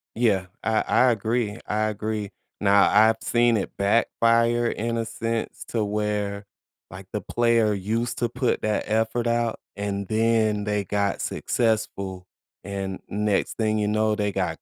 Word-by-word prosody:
Yeah. 105 Hz, -6 st, +2 dB, 0.2 s
I 110 Hz, -1 st, +2 dB
I 125 Hz, -1 st, +4 dB
agree. 110 Hz, 0 st, -1 dB
I 110 Hz, +1 st, 0 dB
agree. 105 Hz, -1 st, -3 dB, 0.3 s
Now 100 Hz, -1 st, +5 dB
I've 110 Hz, +2 st, +5 dB
seen 120 Hz, -1 st, +3 dB
it 95 Hz, -, -3 dB
backfire 115 Hz, +3 st, +2 dB
in 115 Hz, +1 st, -2 dB
a 115 Hz, -, -1 dB
sense 115 Hz, 0 st, -3 dB
to 115 Hz, -3 st, 0 dB
where, 105 Hz, -1 st, -2 dB, 0.4 s
like, 95 Hz, 0 st, -10 dB
the 105 Hz, -, -3 dB
player 115 Hz, 0 st, +2 dB
used 110 Hz, +5 st, -2 dB
to 120 Hz, -1 st, 0 dB
put 125 Hz, +1 st, -1 dB
that 110 Hz, -1 st, 0 dB
effort 110 Hz, +2 st, 0 dB
out 115 Hz, -1 st, 0 dB, 0.2 s
and 100 Hz, -1 st, -3 dB
then 110 Hz, -2 st, +2 dB
they 105 Hz, -1 st, 0 dB
got 100 Hz, 0 st, -1 dB
successful, 100 Hz, -5 st, -1 dB, 0.4 s
and 95 Hz, -1 st, -4 dB
next 105 Hz, -1 st, 0 dB
thing 110 Hz, -1 st, +1 dB
you 105 Hz, -, 0 dB
know, 110 Hz, 0 st, +1 dB
they 105 Hz, -1 st, -1 dB
got 90 Hz, -4 st, -2 dB
110 Hz, 150 wpm, -24 LUFS, 100-115 Hz, 0.4 s, Now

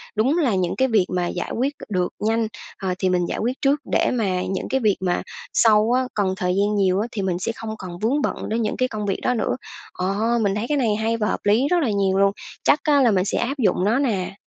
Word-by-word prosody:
Đúng 255 Hz, +9 st, +2 dB
là 265 Hz, -, +2 dB
những 180 Hz, -2 st, 0 dB
cái 265 Hz, -, +2 dB
việc 215 Hz, -7 st, +3 dB
mà 175 Hz, -1 st, 0 dB
giải 175 Hz, -, -4 dB
quyết 270 Hz, +4 st, 0 dB
c -, -, -11 dB
được 180 Hz, -2 st, 0 dB
nhanh, 225 Hz, +1 st, +1 dB, 0.3 s
ờ, 190 Hz, -2 st, -2 dB
thì 185 Hz, -, +1 dB
mình 180 Hz, -1 st, +1 dB
giải -, -, -3 dB
quyết 240 Hz, +3 st, 0 dB
trước 280 Hz, +2 st, +2 dB
để -, -, +2 dB
mà 195 Hz, -7 st, 0 dB
những 190 Hz, -, -3 dB
cái 265 Hz, -, +1 dB
việc 215 Hz, -5 st, +2 dB
mà 180 Hz, -2 st, 0 dB, 0.3 s
sau 220 Hz, 0 st, +4 dB
á, 255 Hz, +1 st, +3 dB
còn 195 Hz, -3 st, 0 dB
thời 180 Hz, 0 st, 0 dB
gian 205 Hz, +2 st, +1 dB
nhiều 190 Hz, -2 st, +2 dB
á 220 Hz, -, -1 dB
thì 205 Hz, -, -3 dB
mình 185 Hz, -2 st, -1 dB
sẽ 185 Hz, -, -2 dB
không 225 Hz, -, -7 dB
còn 175 Hz, -3 st, -8 dB
vướng 255 Hz, +8 st, +1 dB
bận -, -, -1 dB
đến 225 Hz, +2 st, 0 dB
những 215 Hz, -, -2 dB
cái 255 Hz, -, +1 dB
công 215 Hz, -4 st, -4 dB
việc 195 Hz, -2 st, -1 dB
đó 250 Hz, -, +1 dB
nữa. 225 Hz, -, -1 dB, 0.4 s
Ờ, 185 Hz, +2 st, -2 dB, 0.3 s
mình 200 Hz, -2 st, +1 dB
thấy 210 Hz, +2 st, -2 dB
cái 295 Hz, -, +1 dB
này 230 Hz, -6 st, +1 dB
hay 225 Hz, +2 st, 0 dB
và 210 Hz, -2 st, 0 dB
hợp -, -, -1 dB
lý 215 Hz, +7 st, +3 dB
rất 355 Hz, +3 st, +2 dB
là 255 Hz, -, +1 dB
nhiều 195 Hz, -2 st, +1 dB
luôn, 195 Hz, 0 st, +4 dB, 0.3 s
chắc 300 Hz, -, +4 dB
á 290 Hz, -2 st, +4 dB
là 245 Hz, -4 st, +4 dB
mình 185 Hz, -2 st, +2 dB
sẽ -, -, -1 dB
áp 265 Hz, +4 st, -1 dB
dụng 205 Hz, -6 st, +2 dB
nó 225 Hz, +6 st, +2 dB
nè. 200 Hz, -9 st, -1 dB
210 Hz, 275 wpm, -22 LUFS, 190-245 Hz, 0.4 s, sau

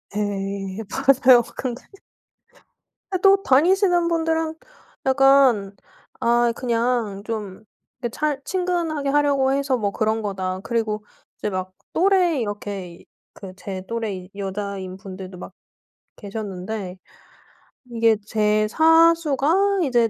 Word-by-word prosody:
예 200 Hz, 0 st, -3 dB
맞아요. 260 Hz, -1 st, +5 dB, 0.2 s
근데 250 Hz, -1 st, -4 dB, 1.3 s
근데 370 Hz, -2 st, -1 dB
또 390 Hz, 0 st, +5 dB
다니시는 350 Hz, +5 st, +3 dB
분들은 325 Hz, -1 st, 0 dB, 0.5 s
약간 265 Hz, -7 st, +4 dB, 0.5 s
아 235 Hz, 0 st, +3 dB
그냥 235 Hz, -4 st, -1 dB
좀 215 Hz, -2 st, -6 dB, 0.4 s
그 240 Hz, -, -2 dB
잘 295 Hz, +2 st, -2 dB
친근하게 340 Hz, -6 st, -1 dB
하려고 280 Hz, -2 st, +2 dB
해서 275 Hz, -1 st, +1 dB
뭐 200 Hz, -2 st, -1 dB
그런 220 Hz, +1 st, 0 dB
거다. 190 Hz, -2 st, -3 dB
그리고 215 Hz, -3 st, -2 dB, 0.3 s
이제 210 Hz, -, -3 dB
막 185 Hz, -1 st, -4 dB, 0.2 s
또래 360 Hz, -5 st, +3 dB
이렇게 205 Hz, -3 st, -4 dB
이 -, -, -19 dB, 0.3 s
그 190 Hz, -2 st, -11 dB
제 190 Hz, -1 st, -6 dB
또래 210 Hz, -5 st, -4 dB
여자인 195 Hz, -1 st, -5 dB
분들도 190 Hz, -1 st, -9 dB
막 -, -, -9 dB, 0.6 s
계셨는데 200 Hz, -2 st, -6 dB, 0.9 s
이게 230 Hz, -1 st, +3 dB
제 215 Hz, 0 st, +1 dB
사수가 330 Hz, -, +3 dB
이제 240 Hz, -5 st, +2 dB
230 Hz, 220 characters per minute, -22 LUFS, 200-290 Hz, 1.3 s, 맞아요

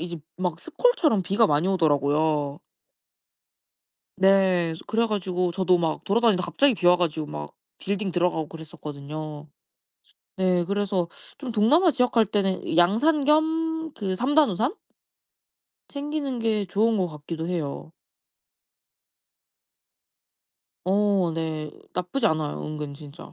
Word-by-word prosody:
이제 170 Hz, 0 st, -5 dB, 0.2 s
막 180 Hz, -3 st, -2 dB
스콜처럼 330 Hz, -, +2 dB
비가 205 Hz, +5 st, +3 dB
많이 150 Hz, +4 st, +1 dB
오더라고요. 150 Hz, -3 st, +1 dB, 1.6 s
네. 190 Hz, -3 st, +3 dB
이제 -, -, -10 dB
그래 230 Hz, +1 st, +1 dB
가지고 185 Hz, -4 st, -1 dB
저도 185 Hz, -1 st, +2 dB
막 165 Hz, -2 st, -2 dB
돌아다니다 215 Hz, -3 st, +2 dB
갑자기 275 Hz, +6 st, +2 dB
비 175 Hz, -, -2 dB
와 180 Hz, 0 st, +7 dB
가지고 160 Hz, -3 st, -1 dB
막 75 Hz, -, -7 dB, 0.2 s
빌딩 200 Hz, -1 st, -3 dB
들어가고 175 Hz, -3 st, 0 dB
그랬었거든요. 150 Hz, -1 st, -8 dB, 0.9 s
네. 180 Hz, -2 st, +2 dB
그래서 195 Hz, -3 st, -1 dB, 0.3 s
좀 265 Hz, -4 st, -6 dB
동남아 300 Hz, -, +4 dB
지역 250 Hz, -2 st, +1 dB
갈 230 Hz, -2 st, +4 dB
때는 195 Hz, -4 st, -1 dB
양산 245 Hz, -, +3 dB
겸 315 Hz, +2 st, +3 dB, 0.3 s
그 190 Hz, -3 st, -2 dB
3 260 Hz, +8 st, -1 dB
단 300 Hz, -5 st, +6 dB
우산 230 Hz, -, 0 dB, 1.2 s
챙기는 285 Hz, -3 st, -4 dB
게 220 Hz, -3 st, 0 dB
좋은 220 Hz, +4 st, +1 dB
것 185 Hz, -2 st, +1 dB
같기도 160 Hz, +2 st, -6 dB
해요. 160 Hz, -2 st, -4 dB, 2.9 s
어 195 Hz, -2 st, +2 dB
네. 155 Hz, -2 st, -3 dB, 0.2 s
나쁘지 180 Hz, +7 st, -1 dB
않아요 155 Hz, -3 st, -1 dB
은근 150 Hz, -2 st, -5 dB
진짜. 145 Hz, +2 st, -12 dB
185 Hz, 250 characters per minute, -25 LUFS, 160-225 Hz, 2.9 s, 와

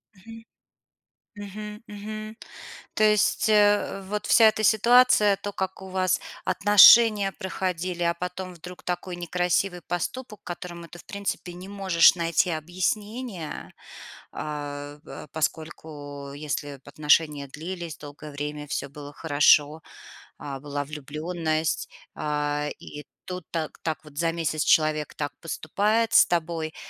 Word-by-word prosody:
Мгм. 225 Hz, +4 st, -12 dB, 0.9 s
Мгм, 210 Hz, +1 st, -8 dB
мгм. 215 Hz, +1 st, -7 dB, 0.6 s
То 215 Hz, -, +2 dB
есть, 210 Hz, 0 st, +3 dB
э, 205 Hz, -2 st, +3 dB
вот 210 Hz, +2 st, -4 dB
вся 225 Hz, 0 st, +7 dB
эта 215 Hz, 0 st, -1 dB
ситуация, 220 Hz, -2 st, +5 dB
то, 205 Hz, 0 st, -5 dB
как 190 Hz, 0 st, -4 dB
у 190 Hz, -, -9 dB
вас 185 Hz, 0 st, +1 dB, 0.2 s
отношения 205 Hz, 0 st, +7 dB
проходили, 185 Hz, -2 st, -3 dB
а 170 Hz, 0 st, +3 dB
потом 180 Hz, +1 st, -6 dB
вдруг 180 Hz, +1 st, -11 dB
такой 180 Hz, 0 st, -4 dB
некрасивый 180 Hz, +1 st, 0 dB
поступок, 210 Hz, +5 st, -5 dB
которому 175 Hz, -1 st, -7 dB
ты, 175 Hz, -, -12 dB
в -, -, -15 dB
принципе, 200 Hz, -3 st, -4 dB
не 180 Hz, +2 st, -10 dB
можешь 190 Hz, -5 st, +5 dB
найти 170 Hz, +1 st, +1 dB
объяснения. 185 Hz, +4 st, -3 dB, 0.6 s
А, 145 Hz, -1 st, -6 dB
а, -, -, -9 dB
поскольку, 150 Hz, -3 st, -5 dB
если 145 Hz, 0 st, -4 dB
б 135 Hz, -, -24 dB
отношения 150 Hz, -1 st, +2 dB
длились 170 Hz, +3 st, -7 dB
долгое 150 Hz, +1 st, -10 dB
время, 150 Hz, +1 st, -5 dB
всё 140 Hz, -, -3 dB
было 145 Hz, +1 st, -10 dB
хорошо, 150 Hz, 0 st, +3 dB, 0.6 s
а, 140 Hz, -2 st, -7 dB
была 145 Hz, -1 st, -4 dB
влюбленность, 155 Hz, +2 st, -2 dB, 0.3 s
а, 150 Hz, 0 st, -1 dB
и 150 Hz, -, -9 dB, 0.2 s
тут 180 Hz, -1 st, -5 dB
так 160 Hz, -2 st, -4 dB
так 160 Hz, -2 st, -3 dB
вот 150 Hz, -1 st, -10 dB
за 165 Hz, -1 st, +2 dB
месяц 155 Hz, -2 st, -1 dB
человек 155 Hz, -2 st, +2 dB
так 145 Hz, -1 st, -3 dB
поступает 210 Hz, +7 st, 0 dB
с -, -, +7 dB
тобой. 165 Hz, -2 st, -2 dB
175 Hz, 130 wpm, -25 LUFS, 150-200 Hz, 0.9 s, вся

